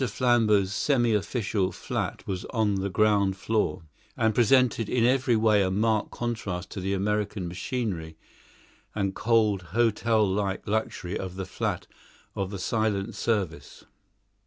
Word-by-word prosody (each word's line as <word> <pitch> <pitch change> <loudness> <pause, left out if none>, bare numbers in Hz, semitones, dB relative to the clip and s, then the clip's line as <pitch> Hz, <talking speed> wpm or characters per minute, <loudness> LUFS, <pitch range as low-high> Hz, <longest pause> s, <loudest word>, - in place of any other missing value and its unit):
Flambeau's 110 -5 +2
semi 120 -1 +2
official 105 -2 0
flat - - -4
was 95 -2 -3
on 110 -3 0
the 100 - -1
ground 100 -1 +2
floor, 105 -2 -1 0.3
and 110 -3 +2
presented 120 -1 +3
in 120 -2 +2
every 130 -1 +3
way 110 -2 +4
a 95 - +1
marked 110 +2 +1
contrast 105 -6 -4
to 95 - -5
the 95 +1 -1
American 105 -1 -1
machinery 90 -4 -4 0.8
and 100 -2 -1
cold 110 -4 +2 0.2
hotel 115 -2 +3
like 95 0 -1
luxury 105 -3 -2
of 95 -1 -5
the 95 0 -4
flat - - -3 0.5
of 95 -1 -3
the 100 - -5
Silent 105 0 -1
Service. 90 -10 -3
105 Hz, 135 wpm, -27 LUFS, 95-115 Hz, 0.8 s, way